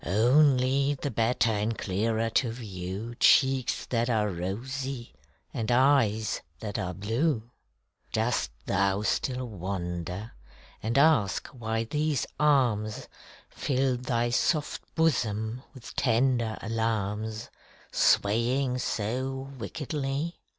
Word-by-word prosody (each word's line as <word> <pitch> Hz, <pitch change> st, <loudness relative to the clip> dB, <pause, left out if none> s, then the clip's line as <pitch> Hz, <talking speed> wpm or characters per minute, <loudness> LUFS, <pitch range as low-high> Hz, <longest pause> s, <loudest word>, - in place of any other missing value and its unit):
Only 130 Hz, -, +3 dB
the 140 Hz, +1 st, -4 dB
better 115 Hz, +1 st, +2 dB
and 110 Hz, +1 st, -1 dB
clearer 110 Hz, +4 st, 0 dB
to 120 Hz, 0 st, +2 dB
view 100 Hz, 0 st, -6 dB
Cheeks 130 Hz, -1 st, +4 dB
that 120 Hz, 0 st, 0 dB
are 110 Hz, -3 st, +2 dB
rosy 120 Hz, +8 st, -4 dB, 0.4 s
and 115 Hz, +1 st, -2 dB
eyes 120 Hz, -5 st, +3 dB, 0.2 s
that 105 Hz, -1 st, -4 dB
are 90 Hz, -1 st, -3 dB
blue. 115 Hz, -, -1 dB, 0.6 s
Dost 110 Hz, +2 st, 0 dB, 0.2 s
thou 100 Hz, +2 st, +1 dB
still 125 Hz, +3 st, -1 dB
wonder, 90 Hz, 0 st, -4 dB, 0.5 s
and 115 Hz, +4 st, -1 dB
ask 140 Hz, -10 st, +4 dB
why 115 Hz, -2 st, -2 dB
these 150 Hz, +4 st, 0 dB
arms 120 Hz, -8 st, +2 dB, 0.4 s
Fill 130 Hz, -1 st, 0 dB
thy 120 Hz, -1 st, -1 dB
soft 150 Hz, +4 st, +1 dB
bosom 115 Hz, -7 st, 0 dB
with 130 Hz, -4 st, -11 dB
tender 120 Hz, -2 st, +2 dB
alarms, 110 Hz, -1 st, -2 dB, 0.4 s
Swaying 125 Hz, +5 st, +2 dB
so 130 Hz, +5 st, -2 dB
wickedly? 145 Hz, +5 st, -3 dB
115 Hz, 100 wpm, -28 LUFS, 110-135 Hz, 0.6 s, Cheeks